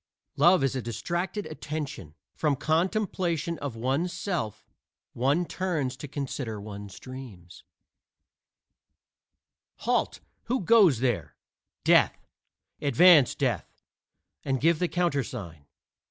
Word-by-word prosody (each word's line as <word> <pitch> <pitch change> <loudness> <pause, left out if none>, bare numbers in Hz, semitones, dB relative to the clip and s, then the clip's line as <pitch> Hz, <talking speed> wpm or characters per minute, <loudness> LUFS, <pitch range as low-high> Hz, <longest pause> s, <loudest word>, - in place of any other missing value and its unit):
Love 170 +1 +5
is 135 -1 +1
a 130 - -1
distracted 175 - -3
attention: 145 - -6 0.2
from 150 -3 +1
contemplation 170 - 0
of 140 -5 -5
one's 135 +10 -1
self 170 - -3 0.5
one 140 +8 +1
turns 160 -9 -2
to 145 - -8
consider 130 -5 -4
one's 100 -2 -9
dream. 130 -9 -10 2.3
"Halt! - - 0 0.3
who 255 0 0
goes 185 - +5
there?" 120 -5 -1 0.5
"Death." - - +4 0.6
"Advance, 145 +1 +6
Death, 120 - -2 0.6
and 135 -1 0
give 165 +3 +3
the 180 - +1
countersign." 125 - -2
140 Hz, 100 wpm, -27 LUFS, 120-175 Hz, 2.3 s, Advance